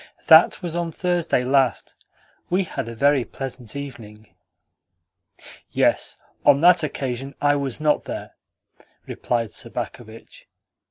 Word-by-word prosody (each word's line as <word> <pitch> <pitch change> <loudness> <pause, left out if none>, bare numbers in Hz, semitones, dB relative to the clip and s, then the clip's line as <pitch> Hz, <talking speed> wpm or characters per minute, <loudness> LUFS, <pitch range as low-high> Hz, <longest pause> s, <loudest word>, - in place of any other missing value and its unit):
"That 160 +2 +6
was 170 -2 -4
on 170 -1 -2
Thursday 175 -6 0
last. 130 -1 +1 0.5
We 185 +2 +1
had 140 -9 -5
a 115 - -8
very 140 +2 +3
pleasant 125 -3 -7
evening." 110 -6 -9 1.4
"Yes, - - +1 0.3
on 140 -1 +5
that 175 0 +6
occasion 135 -3 -4
I 145 0 +3
was 140 -2 -3
not 150 -1 +1
there," - - -6 0.7
replied 115 -4 -2
Sobakevitch. 110 +1 -7
140 Hz, 115 wpm, -22 LUFS, 120-160 Hz, 1.4 s, That